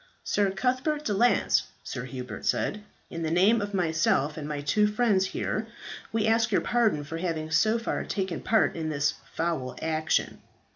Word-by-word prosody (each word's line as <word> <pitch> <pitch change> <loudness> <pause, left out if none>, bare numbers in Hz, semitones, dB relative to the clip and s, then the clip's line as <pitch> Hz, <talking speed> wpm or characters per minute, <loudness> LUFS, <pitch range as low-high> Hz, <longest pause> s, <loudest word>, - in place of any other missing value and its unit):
"Sir 205 -1 +1
Cuthbert 255 +9 -1
de 210 - 0
Lance," 240 +5 +3 0.2
Sir 125 -1 -5
Hubert 125 -4 -7
said, 210 - 0 0.3
"in 165 - -5
the 160 - -1
name 195 +7 +4
of 205 0 -3
myself 160 -4 +1
and 150 -2 -5
my 150 -1 -3
two 210 +9 +2
friends 210 -3 +2
here 215 +3 -3 0.4
we 220 -1 +1
ask 225 +1 +2
your 195 - +3
pardon 225 -11 +1
for 160 +3 -6
having 160 -3 -3
so 215 +8 +3
far 230 - -2
taken 190 -4 -3
part 220 - +2
in 160 -2 -3
this 145 -1 +1 0.2
foul 160 -7 -2
action. 160 0 -1
185 Hz, 175 wpm, -27 LUFS, 155-220 Hz, 0.4 s, name